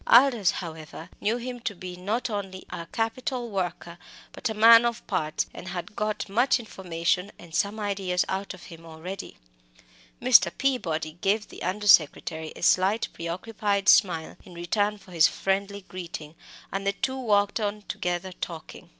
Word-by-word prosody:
Aldous, 235 -6 +6
however, 160 0 -6
knew 220 +3 +1
him 245 0 -5
to 220 -3 -3
be 180 0 -7
not 205 +7 -2
only 195 -4 -5
a 170 - -6
capital 235 +3 -2
worker, 175 -3 -3 0.3
but - - -3
a 220 - -3
man 230 +2 +8
of 235 -1 -1
parts, 155 0 -1
and 180 - -9
had 180 +2 -6
got 215 0 -2
much 245 +6 +3
information 180 -3 -2
and 170 -2 -14
some 205 +5 0
ideas 195 -3 0
out 195 0 -3
of 180 - -15
him 165 -1 -12
already. 165 +4 -8 0.8
Mr. 225 -9 +6
Peabody 165 - -1
gave 210 +2 +1
the - - -11
under 195 +4 -2
secretary 160 -3 +4
a - - -9
slight 195 +5 +3
preoccupied 200 +3 -2
smile 175 -4 +4
in 180 - -13
return 205 +5 0
for 195 - -17
his 165 -2 +6
friendly 200 +1 -1
greeting, 165 -4 -7 0.4
and 195 +1 -3
the 200 - +2
two 265 +5 -2
walked 205 -3 +2
on 210 0 -2
together 185 -3 -3
talking. 165 -3 -8
195 Hz, 160 wpm, -26 LUFS, 175-215 Hz, 0.8 s, man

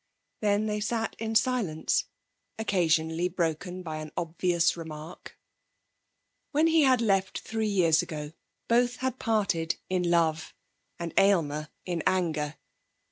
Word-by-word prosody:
Then 210 0 +2
they 210 -1 -1
sat 225 +1 -2
in 225 0 -3
silence, 220 -9 +1 0.5
occasionally 170 -5 +1
broken 180 +1 -2
by 160 -2 -5
an 155 0 -7
obvious 170 0 +1
remark. 160 0 -9 1.1
When 305 +2 +3
he 325 -1 +4
had 260 -4 +4
left 195 -4 +1
three 220 -1 -2
years 170 -5 +3
ago 150 -3 -6 0.3
both 245 +1 +3
had 260 -1 -3
parted 190 -8 0 0.2
in 180 -2 +1
love, 160 -2 +1 0.4
and 170 -2 -5
Aylmer 155 -6 +2 0.2
in 175 -3 -2
anger. 160 -5 0
180 Hz, 125 wpm, -28 LUFS, 160-220 Hz, 1.1 s, he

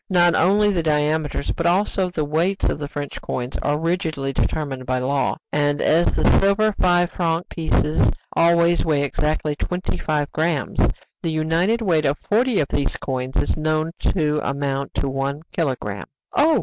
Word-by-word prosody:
Not 175 -2 +4
only 205 +4 +3
the 175 - +1
diameters, 150 -1 0
but 170 - -1
also 190 +1 +1
the 160 -4 -2
weights, 170 +6 0
of - - -1
the 145 - -4
French 145 -1 -6
coins 125 0 -4
are 145 - 0
rigidly 160 -4 -2
determined 135 -3 -2
by 130 0 +1
law, 135 +2 0 0.2
and 145 0 +1
as 165 +2 +2
the - - 0 0.2
silver 205 +2 +3
five 175 -1 +3
franc 165 -1 -1
pieces 160 -1 +1 0.3
always 170 0 +4
weigh 150 -3 +1
exactly 150 +1 -1
twenty 180 +5 -3
five 150 -2 -1
grammes, 160 -4 -1 0.4
the 165 - -1
united 165 +9 +1
weight 165 -6 +2
of 140 +2 +1
forty 235 +1 +1
of 145 - 0
these 140 - -1
coins 130 0 -4
is - - +1
known 155 +1 0
to 150 -4 +1
amount 140 0 -2
to - - -1
one 135 +2 -3
kilogramme. 125 - -3 0.3
"Oh!" 315 +2 +4
155 Hz, 165 wpm, -22 LUFS, 145-175 Hz, 0.4 s, Not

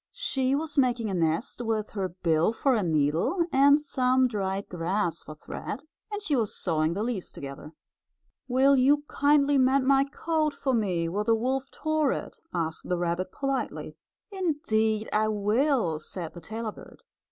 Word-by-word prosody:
She 270 - 0
was 305 0 -1
making 240 -5 +1
a - - -2
nest 170 - -1
with 220 -2 -2
her 195 -3 -2
bill 170 +2 +1
for 270 +3 +2
a 225 - +2
needle 165 - +1
and 280 +2 +6
some 260 -3 +2
dried 195 -3 -3
grass 175 0 -1
for 155 - -9
thread, 200 - -6 0.3
and 415 0 -4
she 300 -8 +1
was 225 -5 0
sewing 160 -1 0
the 205 - -1
leaves 225 -6 -3
together. 140 +2 -9 0.7
"Will 265 +2 +4
you 280 +3 +4
kindly 285 -1 +3
mend 260 +1 +3
my 275 0 +4
coat 310 +1 -1
for 265 - -1
me 185 -7 0
where 200 +5 -1
the 225 +1 +3
wolf 260 +4 -1
tore 310 -1 0
it?" - - -7
asked 160 -1 -3
the 180 - +1
rabbit 175 +2 -2
politely. 275 -2 -3 0.4
"Indeed 220 - 0
I 215 +1 +3
will," 215 - +1
said 165 +1 -6
the 175 - -10
tailor 220 +5 -5
bird. - - -15
225 Hz, 165 wpm, -27 LUFS, 180-275 Hz, 0.7 s, and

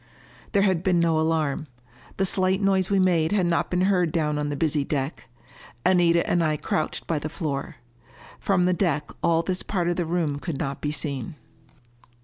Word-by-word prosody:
There 200 -2 +4
had 190 -5 +2
been 180 -2 +2
no 165 -2 +2
alarm. 155 -2 0 0.5
The 195 - +2
slight 185 0 +2
noise 195 -2 +2
we 200 - +2
made 175 -3 +2
had 195 -4 +2
not 170 -1 0
been 180 0 0
heard 185 -3 +2
down 150 -2 0
on 145 0 -2
the 145 - -2
busy 150 0 +1
deck. 140 -2 -4 0.6
Anita 175 -2 +3
and 175 -1 +2
I 155 -1 +1
crouched 155 - -2
by 160 -3 -1
the 155 - -5
floor. 150 -4 -4 0.6
From 185 -3 +2
the 180 - +3
deck 150 - -1
all 165 -1 +2
this 185 +1 -1
part 180 -4 -2
of 175 - -1
the 175 -3 -1
room 160 -4 -1
could 160 -2 -4
not 135 0 -4
be 145 - -1
seen. 145 -3 -3
170 Hz, 190 wpm, -25 LUFS, 150-185 Hz, 0.6 s, There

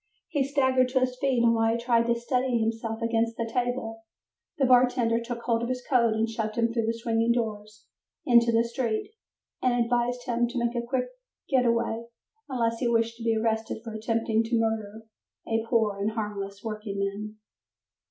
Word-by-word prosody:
He 290 -4 +1
staggered 260 -2 +2
to 260 0 +1
his 255 0 0
feet, 265 -4 +2
and 230 0 +5
while 225 0 +2
he - - 0
tried 235 -1 +2
to 235 - +3
steady 250 0 0
himself 225 0 -2
against 230 0 0
a 230 - 0
table, 235 -1 -2 0.6
the 275 - +3
bartender 245 -2 +4
took 235 0 -6
hold 230 -2 +1
of 235 - -2
his 250 -1 -3
coat 235 -4 +3
and 220 +1 +1
shoved 220 -1 -3
him 230 0 +1
through 230 -2 0
the 230 0 -1
swinging 230 0 +1
doors 215 -2 -4 0.4
into 235 -2 +5
the 230 0 +3
street, 235 - -2 0.5
and 250 -1 +2
advised 245 +1 -1
him 240 -1 +1
to 245 - -6
make 235 0 0
a 240 - 0
quick 250 +1 -1 0.4
getaway 235 -3 +1 0.5
unless 230 -3 0
he 250 - 0
wished 230 0 +1
to 230 - -8
be 225 -1 +2
arrested 220 0 -1
for 225 -2 -7
attempting 225 0 0
to 230 0 +1
murder 220 -1 -2 0.4
a 225 0 0
"poor 220 -4 +2
and 210 +2 -1
harmless 200 -2 -5
working 215 -2 -5
man". 200 +2 -3
230 Hz, 185 wpm, -27 LUFS, 225-245 Hz, 0.6 s, and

